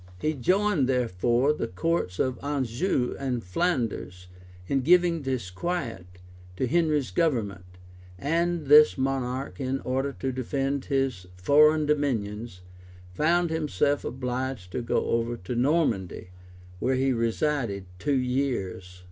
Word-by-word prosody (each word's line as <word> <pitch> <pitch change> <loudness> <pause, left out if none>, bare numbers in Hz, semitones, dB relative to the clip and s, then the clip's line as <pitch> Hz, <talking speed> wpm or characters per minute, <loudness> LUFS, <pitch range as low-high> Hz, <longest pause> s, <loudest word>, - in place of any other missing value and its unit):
He 155 +10 0
joined, 180 - +1
therefore, 120 +3 +2
the 115 - -3
counts 90 - -1
of 130 -2 0
Anjou 135 - -1
and 130 -4 -2
Flanders 90 - -2 0.4
in 135 +6 0
giving 170 +2 +4
disquiet 130 - -3 0.5
to 130 - 0
Henry's 150 - +1
government; 100 - -1 0.4
and 170 - 0
this 150 +2 +7
monarch, 130 0 -2
in 135 0 -1
order 135 +2 -1
to 135 0 -3
defend 135 +2 -2
his 135 -10 -1
foreign 150 +9 +5
dominions, 115 -9 -1 0.5
found 170 - +2
himself 150 -2 0
obliged 125 -5 -4
to 125 - -2
go 120 - 0
over 115 +1 0
to 95 +3 -6
Normandy, 120 - 0 0.5
where 130 +5 +1
he 130 0 +2
resided 115 -3 -1
two 145 +3 +1
years. 125 -9 -2
130 Hz, 120 wpm, -26 LUFS, 115-150 Hz, 0.5 s, this